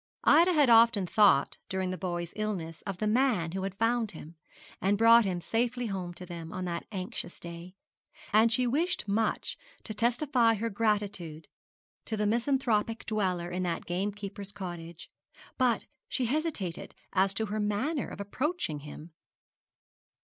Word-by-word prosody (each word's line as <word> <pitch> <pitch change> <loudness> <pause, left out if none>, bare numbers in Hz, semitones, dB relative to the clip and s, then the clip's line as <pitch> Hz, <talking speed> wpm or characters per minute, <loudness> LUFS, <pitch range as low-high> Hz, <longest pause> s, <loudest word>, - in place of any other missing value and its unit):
Ida 340 +5 +6
had 295 -4 +5
often 230 -4 +6
thought 190 -7 +4
during 190 -1 -1
the - - -2
boy's 175 -2 -4
illness 185 -7 -3
of 195 -2 -3
the 215 - -2
man 215 -7 +2
who 190 +2 -3
had 195 0 -4
found 225 -1 +1
him, 160 0 -10 0.5
and 200 +2 +2
brought 230 +1 +7
him 180 -2 -1
safely 240 +6 -1
home 190 -5 -3
to 180 - -8
them 170 -2 -7
on 185 0 -4
that 170 -1 -4
anxious 185 -3 -5
day; 170 +2 -9 0.6
and 220 +2 +5
she 250 +2 +3
wished 290 - 0
much 215 +2 -1 0.2
to 215 - -4
testify 240 +1 +2
her 230 +2 -2
gratitude 200 -7 -1 0.6
to 220 - -3
the 210 - 0
misanthropic 230 -1 +1
dweller 185 -5 -1
in 180 +1 -2
the 175 -2 -1
gamekeeper's 200 +2 -4
cottage; 175 -4 -8 0.5
but 245 -4 +2 0.2
she 255 - 0
hesitated 250 - -2 0.2
as 195 0 +2
to 220 - 0
her 215 +1 -3
manner 215 +9 -1
of - - -9
approaching 205 - -2
him. 150 +3 -10
205 Hz, 155 wpm, -30 LUFS, 180-230 Hz, 0.6 s, brought